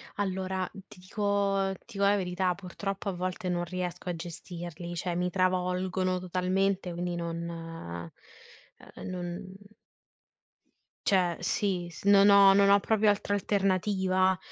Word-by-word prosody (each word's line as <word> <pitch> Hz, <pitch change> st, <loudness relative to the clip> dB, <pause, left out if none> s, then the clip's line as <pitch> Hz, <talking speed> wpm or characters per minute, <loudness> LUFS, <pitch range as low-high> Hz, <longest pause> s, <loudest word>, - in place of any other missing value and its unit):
Allora 190 Hz, -1 st, -2 dB, 0.2 s
ti -, -, -15 dB
dico 195 Hz, 0 st, 0 dB
ti 235 Hz, -4 st, -11 dB
co 200 Hz, -, +1 dB
la 200 Hz, +1 st, +5 dB
verità, 180 Hz, -1 st, 0 dB
purtroppo 195 Hz, +2 st, -5 dB
a -, -, -2 dB
volte 185 Hz, +1 st, -3 dB
non 175 Hz, -1 st, 0 dB
riesco 180 Hz, 0 st, -4 dB
a 175 Hz, -, -1 dB
gestirli, 175 Hz, 0 st, -7 dB
cioè 175 Hz, 0 st, -2 dB
mi 180 Hz, +1 st, 0 dB
travolgono 185 Hz, 0 st, 0 dB
totalmente 185 Hz, +1 st, 0 dB
quindi 175 Hz, +1 st, -3 dB
non 170 Hz, 0 st, -4 dB
ehm, 165 Hz, -, -7 dB, 1.0 s
non 180 Hz, +1 st, -5 dB, 1.5 s
Cioè, 180 Hz, -3 st, +2 dB
sì, 185 Hz, -4 st, -1 dB
s 170 Hz, -, -12 dB
non 200 Hz, 0 st, +7 dB
ho 200 Hz, -1 st, +8 dB
non 200 Hz, 0 st, +5 dB
ho 200 Hz, 0 st, +7 dB
proprio 215 Hz, +1 st, +2 dB
altra 205 Hz, 0 st, 0 dB
alternativa, 190 Hz, -1 st, +1 dB
185 Hz, 130 wpm, -29 LUFS, 175-195 Hz, 1.5 s, ho